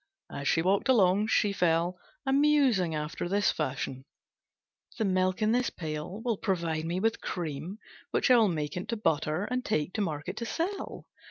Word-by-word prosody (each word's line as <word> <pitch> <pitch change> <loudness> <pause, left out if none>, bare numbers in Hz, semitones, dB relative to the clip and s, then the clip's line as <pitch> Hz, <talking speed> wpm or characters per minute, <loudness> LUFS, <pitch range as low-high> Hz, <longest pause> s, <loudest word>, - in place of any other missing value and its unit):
As 140 - -4
she 165 - +3
walked 195 +7 +1
along, 205 -3 +4
she 205 -2 +2
fell 175 0 +1 0.3
a 270 - +1
musing 270 - +3
after 150 +3 -3
this 205 +1 +2
fashion: 130 -3 -3 0.9
"The 220 - 0
milk 185 +2 +1
in 215 - +3
this 245 +1 +2
pail 160 +6 -6
will 230 -4 +1
provide 165 -6 -1
me 175 +2 -1
with 225 +3 0
cream, 165 +3 -4 0.3
which - - +2
I 250 - +8
will 225 -2 +5
make 155 -1 -3
into 185 +6 -3
butter 155 -3 0
and 250 0 -1
take 155 - -1
to 215 - -1
market 150 -6 -3
to 235 - -3
sell. 370 - -3
185 Hz, 175 wpm, -29 LUFS, 160-225 Hz, 0.9 s, I